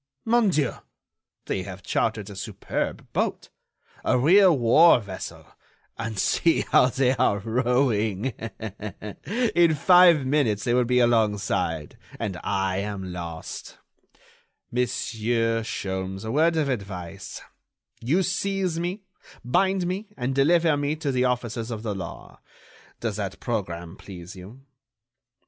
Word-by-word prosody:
"Mon 230 -2 +3
Dieu! 150 -7 +1 0.7
they 95 - -2
have 95 0 -8
chartered 110 -3 -1
a - - -9
superb - - -4
boat, - - -1 0.5
a - - +2
real 175 +5 +6
war 130 +6 +6
vessel, 100 -4 -8 0.5
and 110 -2 -5
see 165 - +2
how - - +6
they 130 0 +2
are 115 -4 +3
rowing. 115 0 0 1.2
In 170 -2 +4
five 175 -2 +6
minutes 130 -7 +1
they 120 - +1
will 125 0 +3
be 125 +1 +1
along 115 -4 +3
side, 80 -5 -2 0.2
and 95 -5 -3
I 95 -2 0
am 100 -2 -4
lost. 85 -2 -7 0.9
Monsieur 115 -1 0
Sholmes, 95 -2 -4
a 110 - -3
word 160 +4 +3
of 155 -3 +1
advice; 95 -9 -5 0.6
you 155 +11 +1
seize 190 -2 -1
me, 180 +4 -3 0.4
bind 190 +8 +2
me 190 +4 -3
and 125 +1 -1
deliver 160 +3 +4
me 145 +1 -1
to 150 -3 -2
the 130 -1 +1
officers 120 -2 -2
of 110 -2 -5
the 110 -3 -2
law. 95 -4 -8 0.6
Does - - -2
that - - -4
programme 85 +1 -4
please 90 -2 -10
you?... 100 +8 -12
120 Hz, 130 wpm, -25 LUFS, 100-150 Hz, 1.2 s, real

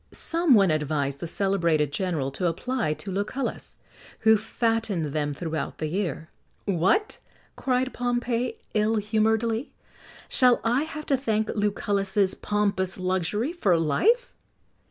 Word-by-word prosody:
Some 330 -5 +3
one 195 -5 +5
advised 145 -2 -1
the 170 - -4
celebrated 170 -6 +1
general 155 -6 -1
to 180 +6 -1
apply 200 0 -1
to 170 +6 -7
Lucullus, 205 +8 -3 0.4
who 220 0 +6
fattened 220 - -1
them 145 -2 -1
throughout 160 0 -4
the 155 - -3
year. 160 -2 -3 0.4
"What," 200 - +1 0.4
cried 260 0 0
Pompey, 245 - -1 0.2
ill 215 +1 +2
humouredly, 220 +3 0 0.5
"shall 250 -2 +4
I 245 +6 +2
have 305 -1 -7
to 275 - +2
thank 220 -4 0
Lucullus's 200 -1 0
pompous 200 -3 -1
luxury 185 - -1
for 195 - +2
life!" 440 - +2
205 Hz, 125 wpm, -26 LUFS, 170-240 Hz, 0.5 s, who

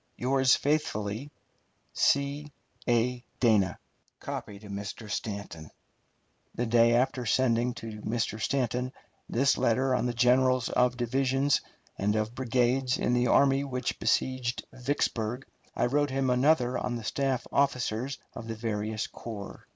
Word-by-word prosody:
Yours 130 +1 +3
faithfully, 135 -4 -1 0.6
C. 140 +1 +1 0.4
A. 120 +1 +1 0.2
DANA. 105 -7 +3 0.4
Mr. 100 +1 -6
STANTON. 100 -7 -5 0.9
The 120 - -1
day 115 0 +4
after 125 0 +1
sending 120 0 +2
to 110 -2 -7
Mr. 110 -1 -2
Stanton 125 0 -1 0.4
this 135 +4 +2
letter 130 +3 +2
on 125 - +1
the 120 - -1
generals 125 +1 +3
of 125 0 +2
divisions 135 +3 +1 0.4
and 105 +2 +1
of 110 +1 -1
brigades 125 0 +1
in 120 - 0
the 125 0 +2
army 135 +1 +4
which 125 -3 -3
besieged 125 +1 0
Vicksburg, 125 -2 -2 0.3
I - - +1
wrote 145 +3 +1
him 135 -1 0
another 125 -1 +3
on 125 - -2
the 115 - -5
staff 135 +2 -1
officers 130 -1 0 0.2
of 115 - -8
the 115 - -4
various 110 -1 -2
corps. 105 -4 -8
125 Hz, 130 wpm, -29 LUFS, 115-130 Hz, 0.9 s, day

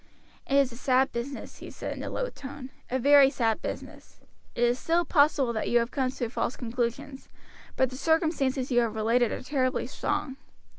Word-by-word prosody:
"It 275 - 0
is 275 -2 +4
a 235 - -10
sad 260 +1 +2
business," 250 +4 -6
he - - -9
said - - -6
in - - -7
a - - -4
low - - -2
tone, 275 -1 -9 0.2
"a 260 - 0
very 280 +1 +6
sad 225 -5 0
business. - - -8 0.4
It 240 - 0
is 240 +1 +2
still 340 +1 +1
possible 285 -6 +3
that 220 - -2
you - - -2
may - - +7
have 235 +2 -3
come 265 -3 0
to 255 -2 -3
false 235 +1 -3
conclusions; 250 +3 -4 0.5
but 260 -1 +1
the 255 - -7
circumstances 285 -4 +1
you 245 - +4
have 230 -2 0
related 230 +2 +2
are - - -5
terribly 260 -2 0
strong. 265 -2 -3
260 Hz, 200 wpm, -27 LUFS, 240-280 Hz, 0.5 s, may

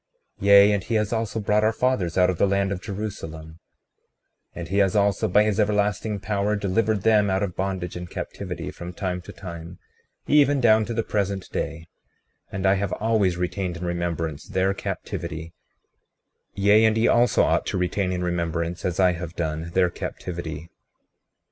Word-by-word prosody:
36:29 100 - -3
Yea, 100 +1 +8
and 100 -2 0
he 115 - -1
has 105 0 0
also 110 -1 -2
brought 105 0 +1
our 110 - +4
fathers 115 -9 0
out 90 0 +4
of 90 - -6
the - - +4
land 100 0 +1
of 95 -2 -3
Jerusalem; 80 -6 -6 1.0
and 85 -1 -6
he 100 +2 +1
has 100 0 +2
also, 100 -1 +2
by 105 - +4
his 105 0 0
everlasting 105 0 0
power, 100 +1 -1
delivered 100 +1 0
them 105 -2 +4
out 95 +1 +1
of 90 -3 -3
bondage 95 -2 -3
and 90 0 -6
captivity, 90 -2 -6
from 90 +1 -8
time 90 0 -3
to 95 - -11
time 85 -2 -9 0.5
even 145 -1 +4
down 110 -3 +4
to 115 - -4
the 115 - 0
present 100 -3 -2
day; 80 0 -4 0.7
and 95 0 -3
I 95 - +5
have 100 - -2
always 105 -5 +1
retained 90 0 -2
in 90 - -5
remembrance 85 -3 -3
their 95 -1 +1
captivity; 80 -3 -5 1.0
yea, 100 +3 +5
and 110 0 +3
ye 110 - +3
also 120 -2 +4
ought - - +1
to - - -1
retain 90 +1 0
in 90 -1 -2
remembrance, 85 -1 -2
as 90 -1 -2
I 90 -1 +5
have 85 0 -6
done, 80 0 -3
their 90 -2 +3
captivity. 85 -3 -6
95 Hz, 180 wpm, -24 LUFS, 90-105 Hz, 1.0 s, Yea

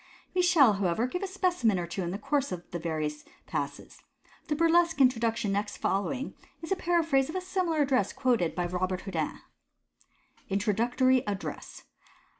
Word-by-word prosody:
We 365 - +3
shall, 325 -11 +6
however, 195 +3 0
give 360 +9 -3
a 390 - -2
specimen 355 - +1
or 175 - -2
two 170 +3 -4
in 175 - -2
the 190 - -3
course 280 +4 -1
of 175 -1 -5
the 175 - -3
various 155 -2 -3 0.2
Passes. - - -5 0.5
The 300 - 0
burlesque 335 +1 +3
introduc 235 -4 +3
tion 225 -4 -2
next 205 +1 -2
following 255 +8 -1 0.3
is 325 - -7
a - - +4
paraphrase 325 -7 +1
of 315 - -6
a 370 - -1
similar 360 -4 0
address 265 -2 +1
quoted 240 -11 +1
by 175 - -1
Robert 185 +1 -2
Houdin: 165 -6 -3 0.6
— - - -34
Introductory 240 +6 +2
Address. 200 -1 -5
245 Hz, 170 wpm, -29 LUFS, -, 0.6 s, shall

